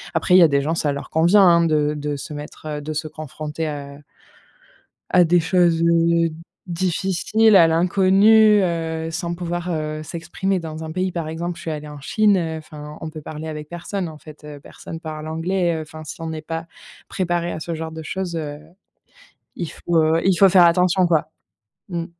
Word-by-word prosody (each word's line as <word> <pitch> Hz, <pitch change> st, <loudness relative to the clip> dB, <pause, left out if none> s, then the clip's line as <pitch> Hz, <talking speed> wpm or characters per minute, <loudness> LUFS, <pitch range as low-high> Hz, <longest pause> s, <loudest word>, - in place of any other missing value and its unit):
Après 180 Hz, -, +1 dB
il -, -, +9 dB
y -, -, +7 dB
a -, -, +7 dB
des 140 Hz, -, +3 dB
gens, 160 Hz, +4 st, -1 dB
ça 145 Hz, -3 st, 0 dB
leur 140 Hz, -, -7 dB
convient, 170 Hz, +6 st, +4 dB
hein 170 Hz, -2 st, +5 dB
de 150 Hz, -1 st, +1 dB
de 145 Hz, 0 st, -3 dB
se 145 Hz, +2 st, -8 dB
mettre, 150 Hz, +1 st, -10 dB
heu, 150 Hz, -1 st, -4 dB
de 155 Hz, +1 st, -5 dB
se 155 Hz, +1 st, -3 dB
confronter 155 Hz, +1 st, -6 dB
à 140 Hz, -1 st, -6 dB, 1.1 s
à 180 Hz, -1 st, +6 dB
des 175 Hz, +1 st, +3 dB
choses, 170 Hz, -1 st, +2 dB
heu, 170 Hz, 0 st, +3 dB, 0.4 s
difficiles, 190 Hz, +5 st, +1 dB
à 170 Hz, -3 st, +8 dB
l'inconnu, 195 Hz, +5 st, +5 dB
heu, 165 Hz, -2 st, -2 dB
sans 170 Hz, +1 st, -3 dB
pouvoir, 175 Hz, 0 st, -4 dB
heu, 155 Hz, -1 st, -3 dB
s'exprimer. 180 Hz, +4 st, -3 dB
Dans 160 Hz, -1 st, -7 dB
un 160 Hz, -, -6 dB
pays 185 Hz, +2 st, -1 dB
par 170 Hz, -3 st, -4 dB
exemple 170 Hz, +2 st, -4 dB
je -, -, -10 dB
suis 160 Hz, -, -4 dB
allée 150 Hz, 0 st, -6 dB
en 150 Hz, -1 st, -9 dB
Chine, 210 Hz, -, +2 dB
heu, 160 Hz, -2 st, -2 dB
enfin 150 Hz, -1 st, -10 dB
on 160 Hz, -, -5 dB
peut 155 Hz, -1 st, -9 dB
parler 155 Hz, +1 st, -7 dB
avec 150 Hz, -1 st, -7 dB
personne 175 Hz, +2 st, -4 dB
en 155 Hz, -1 st, -10 dB
fait, 155 Hz, -1 st, -14 dB
heu, 150 Hz, -1 st, -9 dB
personne 165 Hz, +2 st, -10 dB
parle 155 Hz, -1 st, -7 dB
anglais, 170 Hz, +2 st, 0 dB
heu, -, -, -4 dB
enfin 155 Hz, 0 st, -10 dB
si 160 Hz, -, -9 dB
on 160 Hz, 0 st, -4 dB
est 155 Hz, -1 st, -5 dB
pas 165 Hz, +1 st, -5 dB, 0.4 s
préparé 175 Hz, -2 st, -2 dB
à -, -, -5 dB
ce 170 Hz, +1 st, -5 dB
genre 160 Hz, 0 st, -5 dB
de 160 Hz, 0 st, -8 dB
chose, 180 Hz, +1 st, -4 dB
heu, 150 Hz, -2 st, -5 dB, 1.0 s
il 170 Hz, -, -4 dB
faut, 175 Hz, -, -4 dB
heu 160 Hz, +1 st, +2 dB
il 190 Hz, -2 st, +4 dB
faut 195 Hz, 0 st, +6 dB
faire 180 Hz, -2 st, +6 dB
attention 180 Hz, +1 st, +3 dB
quoi. 160 Hz, -2 st, +1 dB, 0.6 s
Mmh. 170 Hz, -1 st, -3 dB
165 Hz, 205 wpm, -21 LUFS, 155-175 Hz, 1.1 s, il